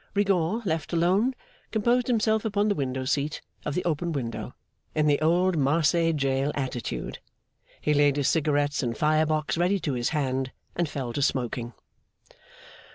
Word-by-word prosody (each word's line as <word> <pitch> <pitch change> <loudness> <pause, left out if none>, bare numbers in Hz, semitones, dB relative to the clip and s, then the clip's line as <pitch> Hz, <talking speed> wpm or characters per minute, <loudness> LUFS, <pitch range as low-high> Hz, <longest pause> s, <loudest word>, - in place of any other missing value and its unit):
Rigaud, 200 +1 +1
left 160 -2 -2
alone, 190 +10 +2 0.3
composed 235 +3 +1
himself 220 -3 +2
upon 210 -1 +1
the - - +3
window 130 -5 -2
seat 145 +3 -1 0.2
of 150 - -3
the 180 - -1
open 170 +1 0
window, 120 -5 -4 0.4
in 155 -1 +2
the 145 0 +3
old 175 +2 +3
Marseilles 165 +3 +2
jail 135 0 0
attitude. 130 -5 -4 0.6
He 150 - +1
laid 145 -1 +4
his 140 -2 +1
cigarettes 145 -2 +1
and 120 -3 -2
fire 155 0 +3
box 155 +1 -1
ready 185 +3 +2
to 145 - -1
his 120 -1 0
hand, 135 -4 -1 0.2
and 170 -3 0
fell 130 -5 -4
to 145 - -2
smoking. 120 -3 -1
155 Hz, 160 wpm, -26 LUFS, 140-180 Hz, 0.6 s, laid